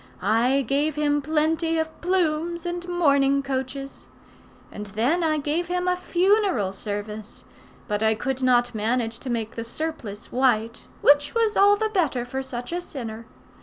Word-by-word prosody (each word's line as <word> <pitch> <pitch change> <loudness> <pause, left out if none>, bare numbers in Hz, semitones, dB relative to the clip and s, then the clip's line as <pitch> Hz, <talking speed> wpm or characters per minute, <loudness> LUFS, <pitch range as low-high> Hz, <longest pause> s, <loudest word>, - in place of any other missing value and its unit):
I 250 +5 +2
gave 285 +3 +1
him 290 -1 +1
plenty 320 +2 +1
of 320 0 -3
plumes 340 -1 0
and 350 0 -4
mourning 280 -5 +3
coaches. 275 0 -5 0.6
And 210 0 -7
then 240 - +1
I 310 -1 +2
gave 305 +4 -1
him 360 0 -1
a 360 - +3
funeral 360 - +1
service, 210 +1 -6 0.4
but 210 -2 -1
I 220 0 +3
could 265 +3 -3
not 245 -1 +3
manage 230 +1 -1
to 260 - -6
make 230 -2 -2
the 230 - -4
surplice 235 -5 -6
white, 235 -3 +1 0.2
which 290 +4 +4
was 450 -2 +2
all 405 +1 +6
the 435 +1 -1
better 315 - 0
for 265 +2 -4
such 250 -1 -6
a 350 +1 -2
sinner. 230 -8 -7
275 Hz, 160 wpm, -24 LUFS, 235-335 Hz, 0.6 s, all